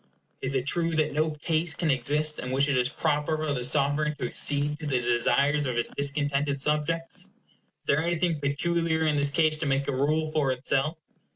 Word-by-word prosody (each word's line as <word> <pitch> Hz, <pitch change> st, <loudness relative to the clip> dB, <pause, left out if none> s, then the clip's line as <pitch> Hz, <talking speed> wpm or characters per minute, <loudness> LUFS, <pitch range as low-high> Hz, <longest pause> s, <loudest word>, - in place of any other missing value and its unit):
Is 135 Hz, +1 st, -1 dB
it 130 Hz, -1 st, 0 dB
true 165 Hz, +2 st, +1 dB
that 155 Hz, -2 st, +1 dB
no 155 Hz, +2 st, +1 dB
case 155 Hz, +1 st, 0 dB
can 165 Hz, -3 st, +1 dB
exist 150 Hz, +4 st, 0 dB
in 125 Hz, -, -5 dB
which 135 Hz, +2 st, +2 dB
it 140 Hz, -, +1 dB
is 125 Hz, 0 st, +2 dB
proper 150 Hz, 0 st, 0 dB
for 155 Hz, -2 st, -1 dB
the 125 Hz, -3 st, -3 dB
sovereign 145 Hz, +3 st, +1 dB
to 130 Hz, -, -4 dB
accede 145 Hz, +4 st, 0 dB
to 155 Hz, -, -5 dB
the 130 Hz, -3 st, +1 dB
desires 125 Hz, +5 st, +2 dB
of 125 Hz, -, -2 dB
his 120 Hz, -, -1 dB
discontented 140 Hz, 0 st, 0 dB
subjects? 150 Hz, +4 st, -1 dB
Is -, -, -25 dB, 0.5 s
there 145 Hz, +3 st, +2 dB
anything 170 Hz, -1 st, 0 dB
peculiar 160 Hz, +3 st, 0 dB
in 155 Hz, -1 st, +2 dB
this 145 Hz, 0 st, +2 dB
case 155 Hz, +1 st, +1 dB
to 155 Hz, -, -1 dB
make 135 Hz, 0 st, 0 dB
a -, -, 0 dB
rule 155 Hz, +3 st, 0 dB
for 150 Hz, -4 st, +1 dB
itself? 135 Hz, +4 st, 0 dB
145 Hz, 200 wpm, -27 LUFS, 140-155 Hz, 0.5 s, which